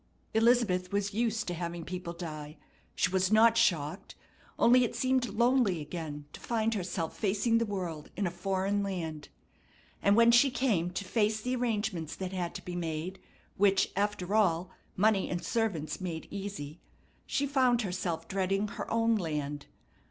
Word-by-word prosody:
Elizabeth 220 Hz, -6 st, +3 dB
was 200 Hz, 0 st, -1 dB
used 225 Hz, 0 st, 0 dB
to 175 Hz, -, -3 dB
having 170 Hz, -1 st, -4 dB
people 180 Hz, -1 st, -5 dB
die. 155 Hz, -3 st, -7 dB, 0.4 s
She 180 Hz, -, +1 dB
was 190 Hz, +1 st, +1 dB
not 225 Hz, +1 st, +6 dB
shocked; 170 Hz, -5 st, +1 dB, 0.4 s
only 250 Hz, +2 st, +6 dB
it 235 Hz, -, -2 dB
seemed 255 Hz, -1 st, +1 dB
lonely 235 Hz, -3 st, +2 dB
again 150 Hz, -1 st, -6 dB
to -, -, -9 dB
find 225 Hz, -1 st, 0 dB
herself 180 Hz, -4 st, -3 dB
facing 220 Hz, +3 st, +1 dB
the 230 Hz, -, 0 dB
world, 175 Hz, -7 st, -4 dB
in 200 Hz, -, 0 dB
a 175 Hz, -, -1 dB
foreign 195 Hz, +3 st, -1 dB
land. 165 Hz, -6 st, -4 dB, 0.7 s
And 200 Hz, 0 st, +4 dB
when 230 Hz, +1 st, +6 dB
she 245 Hz, +4 st, +6 dB
came 230 Hz, -10 st, +1 dB
to 185 Hz, +3 st, -4 dB
face 215 Hz, +1 st, +1 dB
the 250 Hz, +3 st, -2 dB
arrangements 215 Hz, -9 st, -2 dB
that 190 Hz, 0 st, -5 dB
had 175 Hz, -2 st, -3 dB
to -, -, -7 dB
be 180 Hz, -, -5 dB
made, 170 Hz, +2 st, -3 dB, 0.4 s
which, 195 Hz, -1 st, +3 dB
after 200 Hz, -1 st, -1 dB
all, 185 Hz, -4 st, +2 dB, 0.3 s
money 205 Hz, 0 st, +3 dB
and 175 Hz, -1 st, -3 dB
servants 200 Hz, -9 st, -1 dB
made 170 Hz, -3 st, -4 dB
easy, 195 Hz, -7 st, -6 dB, 0.5 s
she 280 Hz, -, 0 dB
found 255 Hz, -4 st, +2 dB
herself 175 Hz, -4 st, -3 dB
dreading 195 Hz, +2 st, 0 dB
her -, -, -6 dB
own 230 Hz, 0 st, +2 dB
land. 150 Hz, -5 st, -3 dB
195 Hz, 160 wpm, -30 LUFS, 175-225 Hz, 0.7 s, not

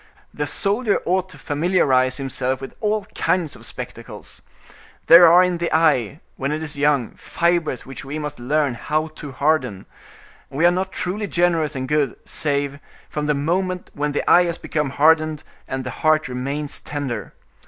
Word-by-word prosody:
The 150 Hz, -, -3 dB
soldier 205 Hz, -, +1 dB
ought 185 Hz, +1 st, 0 dB
to 170 Hz, -, -13 dB
familiarize 145 Hz, -4 st, +1 dB
himself 130 Hz, -1 st, -2 dB
with 135 Hz, -, -8 dB
all 215 Hz, -1 st, 0 dB
kinds 175 Hz, -5 st, 0 dB
of -, -, -9 dB
spectacles. -, -, -9 dB, 0.6 s
There 170 Hz, +1 st, +9 dB
are 175 Hz, +2 st, +7 dB
in 180 Hz, -2 st, 0 dB
the 170 Hz, -, -1 dB
eye, 150 Hz, -4 st, +2 dB, 0.2 s
when 135 Hz, +2 st, -2 dB
it 155 Hz, +1 st, -2 dB
is 150 Hz, -1 st, -3 dB
young, 145 Hz, -4 st, +1 dB
fibers 170 Hz, -6 st, -1 dB
which 135 Hz, -, -8 dB
we 140 Hz, +3 st, -5 dB
must 150 Hz, -2 st, -5 dB
learn 145 Hz, +2 st, +1 dB
how 155 Hz, +6 st, -2 dB
to 150 Hz, -2 st, -9 dB
harden; 130 Hz, -8 st, 0 dB, 0.6 s
and 135 Hz, -, -8 dB
we 165 Hz, -, +3 dB
are 175 Hz, -, +6 dB
not 190 Hz, +1 st, -2 dB
truly 205 Hz, +4 st, -3 dB
generous 170 Hz, -4 st, +1 dB
and 130 Hz, 0 st, -3 dB
good 150 Hz, -3 st, +1 dB
save 140 Hz, -1 st, -1 dB, 0.3 s
from 150 Hz, -1 st, -2 dB
the 150 Hz, -, +2 dB
moment 180 Hz, +5 st, -1 dB
when 150 Hz, 0 st, -2 dB
the 145 Hz, -, -2 dB
eye 180 Hz, -, +6 dB
has 170 Hz, -1 st, -2 dB
become 150 Hz, -3 st, -2 dB
hardened, 155 Hz, +2 st, +3 dB, 0.2 s
and 130 Hz, 0 st, -3 dB
the 125 Hz, -, -5 dB
heart 155 Hz, -2 st, +3 dB
remains 140 Hz, +4 st, -4 dB
tender. 125 Hz, -, -5 dB
150 Hz, 175 wpm, -21 LUFS, 135-170 Hz, 0.6 s, There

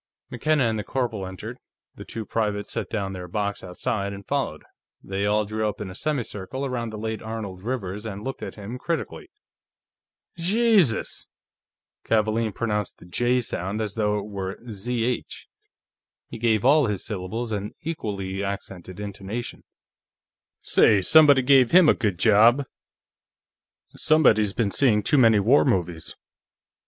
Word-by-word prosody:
McKenna 155 Hz, -3 st, +1 dB
and 110 Hz, -2 st, 0 dB
the -, -, -3 dB
corporal 115 Hz, -7 st, -2 dB
entered; 95 Hz, -1 st, -8 dB, 0.3 s
the -, -, -10 dB
two 110 Hz, -1 st, -6 dB
privates 105 Hz, -1 st, -2 dB
set -, -, -3 dB
down 100 Hz, -3 st, -3 dB
their 90 Hz, -1 st, -7 dB
box 100 Hz, +2 st, -3 dB
outside 100 Hz, +2 st, -3 dB
and 100 Hz, 0 st, -10 dB
followed. -, -, -2 dB, 0.4 s
They 100 Hz, +1 st, -2 dB
all 105 Hz, +1 st, +2 dB
drew 110 Hz, +1 st, -1 dB
up 105 Hz, -, -7 dB
in 100 Hz, -3 st, -5 dB
a -, -, -8 dB
semicircle 130 Hz, -1 st, -3 dB
around 120 Hz, -3 st, -3 dB
the 110 Hz, -, -7 dB
late 110 Hz, +1 st, -4 dB
Arnold 110 Hz, -4 st, -6 dB
Rivers 105 Hz, -3 st, -4 dB
and 105 Hz, -2 st, -6 dB
looked 135 Hz, +2 st, -5 dB
at -, -, -6 dB
him 110 Hz, +4 st, -7 dB
critically. 170 Hz, -, -4 dB, 1.1 s
"Jesus!" 190 Hz, -, +2 dB, 0.8 s
Kavaalen 110 Hz, 0 st, +1 dB
pronounced 105 Hz, -4 st, -2 dB
the -, -, -15 dB
J 120 Hz, +8 st, +1 dB
sound 100 Hz, -2 st, -3 dB
as 105 Hz, -3 st, -3 dB
though 105 Hz, -2 st, 0 dB
it 100 Hz, -, -4 dB
were 100 Hz, -2 st, -5 dB
Zh; 120 Hz, +4 st, -3 dB, 0.8 s
he -, -, -7 dB
gave 110 Hz, -1 st, +1 dB
all 145 Hz, 0 st, +5 dB
his 105 Hz, -3 st, -3 dB
syllables 110 Hz, +4 st, -4 dB
an 105 Hz, 0 st, -4 dB
equally 100 Hz, -11 st, -4 dB
accented 95 Hz, -2 st, -6 dB
intonation. 100 Hz, +3 st, -6 dB, 1.0 s
"Say, 100 Hz, -3 st, +4 dB
somebody 145 Hz, -, +6 dB
gave 130 Hz, -2 st, +5 dB
him 180 Hz, -2 st, +6 dB
a -, -, +7 dB
good 105 Hz, -7 st, -1 dB
job!" 115 Hz, +7 st, +5 dB, 1.3 s
"Somebody's 110 Hz, -10 st, +3 dB
been 110 Hz, -4 st, 0 dB
seeing 110 Hz, -5 st, +3 dB
too 145 Hz, -, +3 dB
many 115 Hz, -4 st, +6 dB
war 120 Hz, +9 st, +4 dB
movies." 90 Hz, -, -1 dB
110 Hz, 145 wpm, -24 LUFS, 100-125 Hz, 1.3 s, a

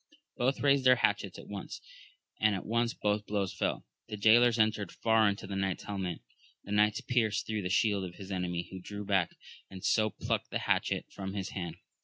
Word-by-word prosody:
Both 130 Hz, +3 st, 0 dB
raised 140 Hz, -1 st, +4 dB
their 130 Hz, 0 st, +7 dB
hatchets 120 Hz, -, 0 dB
at -, -, -11 dB
once, -, -, -6 dB, 0.6 s
and 110 Hz, -1 st, +3 dB
at 95 Hz, -, -5 dB
once 115 Hz, +1 st, 0 dB
both 105 Hz, 0 st, -1 dB
blows 100 Hz, -3 st, -1 dB
fell; 85 Hz, -, -2 dB, 0.2 s
the 105 Hz, -, -5 dB
jaylor's 115 Hz, +3 st, +5 dB
entered 110 Hz, -3 st, +1 dB
far 110 Hz, -2 st, +3 dB
into 100 Hz, -, -4 dB
the 100 Hz, -, -5 dB
knight's 95 Hz, -1 st, -1 dB
helmet; 95 Hz, -4 st, -4 dB, 0.4 s
the 100 Hz, -, -9 dB
knight's 105 Hz, 0 st, +3 dB
pierced 110 Hz, -4 st, +1 dB
through 110 Hz, -1 st, -2 dB
the 90 Hz, -, -3 dB
shield 100 Hz, 0 st, +2 dB
of 90 Hz, -1 st, -7 dB
his 100 Hz, -1 st, -9 dB
enemy, 90 Hz, -2 st, -2 dB
who 95 Hz, -, -6 dB
drew 105 Hz, +2 st, -7 dB
back, 95 Hz, -4 st, +1 dB, 0.3 s
and 95 Hz, -1 st, -8 dB
so 110 Hz, -1 st, +3 dB
plucked -, -, -2 dB
the -, -, -1 dB
hatchet -, -, +1 dB
from 95 Hz, 0 st, -6 dB
his 95 Hz, -2 st, -3 dB
hand. 85 Hz, -4 st, -5 dB
105 Hz, 200 wpm, -31 LUFS, 95-110 Hz, 0.6 s, their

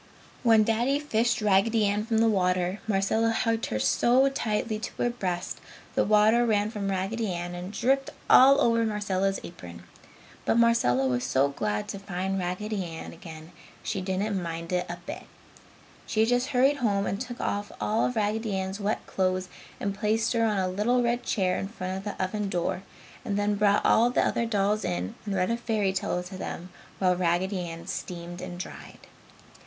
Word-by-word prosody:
When 225 Hz, -3 st, +5 dB
Daddy 235 Hz, +6 st, +1 dB
fished 235 Hz, -6 st, 0 dB
Raggedy 210 Hz, +2 st, +3 dB
Ann 205 Hz, +2 st, 0 dB
from 225 Hz, -1 st, +1 dB
the 225 Hz, +1 st, +4 dB
water, 185 Hz, -2 st, +1 dB
Marcella 215 Hz, +2 st, +2 dB
hugged 225 Hz, 0 st, 0 dB
her 110 Hz, -, -2 dB
so 240 Hz, -, +3 dB
tightly 220 Hz, -4 st, -2 dB
to 220 Hz, -, -5 dB
her 240 Hz, -, +1 dB
breast 185 Hz, -7 st, -3 dB, 0.3 s
the -, -, +2 dB
water 215 Hz, +3 st, +4 dB
ran 215 Hz, -2 st, +1 dB
from 200 Hz, -3 st, -3 dB
Raggedy 195 Hz, +3 st, -1 dB
Ann 175 Hz, 0 st, -4 dB
and 180 Hz, +2 st, -6 dB
dripped 265 Hz, +5 st, +1 dB, 0.2 s
all 275 Hz, +2 st, +7 dB
over 230 Hz, -1 st, +3 dB
Marcella's 195 Hz, -3 st, 0 dB
apron. 85 Hz, -, -10 dB, 0.6 s
But -, -, +1 dB
Marcella 230 Hz, -, +3 dB
was 125 Hz, -1 st, 0 dB
so 135 Hz, +2 st, +2 dB
glad 105 Hz, -6 st, -2 dB
to 200 Hz, -, -5 dB
find 195 Hz, 0 st, -3 dB
Raggedy 190 Hz, +3 st, -2 dB
Ann 165 Hz, -2 st, -7 dB
again 160 Hz, 0 st, -11 dB, 0.3 s
she 195 Hz, -, -2 dB
didn't 190 Hz, +1 st, -1 dB
mind 165 Hz, 0 st, -5 dB
it 180 Hz, 0 st, 0 dB
a 175 Hz, -, -4 dB
bit. -, -, -7 dB, 0.8 s
She 220 Hz, 0 st, +2 dB
just 245 Hz, +2 st, +1 dB
hurried 275 Hz, +1 st, +3 dB
home 205 Hz, -6 st, +1 dB
and 200 Hz, -, -2 dB
took 245 Hz, -1 st, -6 dB
off 205 Hz, 0 st, -2 dB
all 220 Hz, +2 st, +1 dB
of 250 Hz, -, 0 dB
Raggedy 215 Hz, 0 st, 0 dB
Ann's 190 Hz, +1 st, -3 dB
wet 205 Hz, +2 st, -2 dB
clothes 185 Hz, -1 st, -1 dB, 0.3 s
and 200 Hz, -, -2 dB
placed 215 Hz, +3 st, 0 dB
her 230 Hz, -1 st, +2 dB
on 215 Hz, -2 st, +1 dB
a 190 Hz, -1 st, +1 dB
little 215 Hz, +7 st, +1 dB
red 240 Hz, +1 st, +1 dB
chair 185 Hz, -6 st, 0 dB
in 195 Hz, -, -3 dB
front 185 Hz, -3 st, -5 dB
of 190 Hz, -, -5 dB
the 205 Hz, -, -5 dB
oven 200 Hz, +2 st, -1 dB
door, 180 Hz, -1 st, -1 dB, 0.4 s
and 200 Hz, -, -2 dB
then 205 Hz, 0 st, +1 dB
brought 205 Hz, 0 st, +2 dB
all 230 Hz, +2 st, +5 dB
of 245 Hz, -, -4 dB
the -, -, +3 dB
other 230 Hz, -, 0 dB
dolls 210 Hz, -1 st, +1 dB
in 90 Hz, +1 st, -2 dB
and 200 Hz, -, -1 dB
read 185 Hz, +3 st, +1 dB
a 235 Hz, -, 0 dB
fairy 215 Hz, -5 st, 0 dB
tale 180 Hz, -1 st, -1 dB
to 185 Hz, +1 st, -9 dB
them 180 Hz, +2 st, -6 dB, 0.3 s
while 185 Hz, -1 st, +2 dB
Raggedy 180 Hz, +2 st, 0 dB
Ann 165 Hz, 0 st, -8 dB
steamed 175 Hz, 0 st, -6 dB
and 175 Hz, -, -6 dB
dried. 180 Hz, -, -9 dB
200 Hz, 190 wpm, -27 LUFS, 185-225 Hz, 0.8 s, all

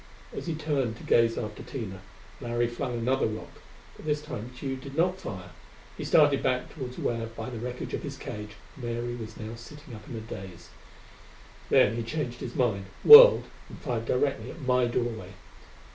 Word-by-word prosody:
As -, -, -6 dB
he 165 Hz, -, -1 dB
turned 140 Hz, -7 st, -1 dB
to -, -, -12 dB
gaze 115 Hz, -1 st, +3 dB
after 105 Hz, -2 st, -5 dB
Tina, 100 Hz, -8 st, -6 dB, 0.4 s
Larry 120 Hz, -1 st, 0 dB
flung 120 Hz, +1 st, -4 dB
another 130 Hz, +4 st, +1 dB
rock. 110 Hz, 0 st, -8 dB, 0.3 s
But -, -, -13 dB
this 150 Hz, 0 st, +1 dB
time 125 Hz, -6 st, -7 dB
Tugh 135 Hz, -2 st, -4 dB
did 140 Hz, +2 st, -9 dB
not 180 Hz, +3 st, +1 dB
fire. 95 Hz, -3 st, -7 dB, 0.4 s
He -, -, -6 dB
started 145 Hz, -3 st, +4 dB
back 125 Hz, -1 st, -1 dB
toward 130 Hz, -4 st, -7 dB
where, 115 Hz, -1 st, -2 dB
by 115 Hz, +3 st, -7 dB
the 120 Hz, -, -6 dB
wreckage 125 Hz, +2 st, -5 dB
of -, -, -2 dB
his -, -, -6 dB
cage, 105 Hz, 0 st, -7 dB, 0.2 s
Mary 120 Hz, -2 st, -4 dB
was 110 Hz, -2 st, -8 dB
now 110 Hz, +1 st, -6 dB
sitting 125 Hz, +3 st, -12 dB
up 105 Hz, -1 st, -11 dB
in -, -, -6 dB
a 110 Hz, -, -5 dB
daze; 95 Hz, -5 st, -9 dB, 1.0 s
then -, -, +5 dB
he -, -, -1 dB
changed 120 Hz, 0 st, -4 dB
his 120 Hz, -, -6 dB
mind, 110 Hz, -6 st, 0 dB, 0.2 s
whirled -, -, +11 dB, 0.3 s
and -, -, -10 dB
fired 115 Hz, -5 st, -3 dB
directly 130 Hz, -2 st, 0 dB
at 165 Hz, -, -10 dB
my 125 Hz, -2 st, +2 dB
doorway. 120 Hz, -1 st, -3 dB
120 Hz, 185 wpm, -28 LUFS, 115-135 Hz, 1.0 s, whirled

